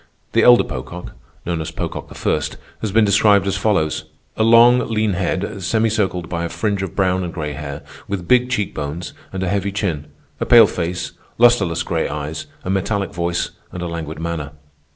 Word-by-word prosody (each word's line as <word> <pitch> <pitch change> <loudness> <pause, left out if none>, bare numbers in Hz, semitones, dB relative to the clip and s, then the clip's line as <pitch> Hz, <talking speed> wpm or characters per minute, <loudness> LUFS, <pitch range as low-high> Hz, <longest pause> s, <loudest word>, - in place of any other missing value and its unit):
The - - +4
elder 120 -1 +7
Pocock, 85 +8 -7 0.3
known 85 -2 -1
as 80 - -4
Pocock - - -5
I., - - 0 0.5
has 110 - -2
been 110 +1 +4
described 100 -1 +4
as 100 0 0
follows: 95 -6 0 0.3
"A - - -2
long, 115 +2 +7
lean 110 -2 +1
head, 95 +3 -2
semicircled 105 -3 0
by 85 -1 -3
a 85 - -2
fringe 100 0 -1
of 95 -3 -5
brown 95 -1 +1
and 85 - -4
gray 75 -3 -4
hair, 70 0 -6 0.2
with 95 -4 -4
big 125 0 +4
cheek 105 -6 -1
bones 75 +4 -5 0.2
and 95 0 -3
a - - -1
heavy 100 +1 0
chin,... 90 -8 -2 0.3
a - - -1
pale 120 -2 +9
face, 90 -2 -3 0.3
lustreless 110 -8 +4
gray 80 -2 -1
eyes, 75 +1 -5 0.2
a - - -3
metallic 100 0 -1
voice, 85 +1 -1 0.2
and 90 - -5
a - - -2
languid 80 -2 -5
manner." 80 -3 -4
95 Hz, 185 wpm, -20 LUFS, 85-105 Hz, 0.5 s, pale